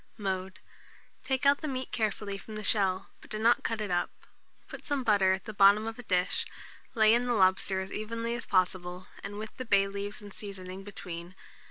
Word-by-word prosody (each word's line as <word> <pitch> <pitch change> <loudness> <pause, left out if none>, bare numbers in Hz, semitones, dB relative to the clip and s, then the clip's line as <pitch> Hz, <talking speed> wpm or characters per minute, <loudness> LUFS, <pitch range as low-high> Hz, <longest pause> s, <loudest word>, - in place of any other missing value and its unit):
Mode. 190 -2 -3 0.6
Take 265 +1 0
out 280 0 +5
the 310 - -2
meat 260 -2 -3
carefully 210 -2 -1
from 215 +2 -9
the 215 - -5
shell, 195 -3 +1
but - - -15
do 215 - -3
not 230 +2 +4
cut 225 -1 -1
it 205 -3 -3
up. 175 0 +1 0.6
Put - - -9
some 285 -4 -1
butter 200 -5 +4
at 190 +1 -1
the 215 - -6
bottom 200 +2 +6
of 225 +1 -5
a - - -7
dish, 180 -3 +1 0.5
lay 220 -1 +6
in 240 +1 +2
the 245 - +2
lobster 190 -1 +3
as 190 - -6
evenly 230 +2 -3
as 240 - -5
possible, 185 -1 0 0.2
with 205 +2 -6
the 255 - -4
bay 200 -3 +4
leaves 200 +1 -5
and 205 -1 -11
seasoning 190 -2 -7
between. 180 -3 -7
205 Hz, 200 wpm, -30 LUFS, 190-225 Hz, 0.6 s, bottom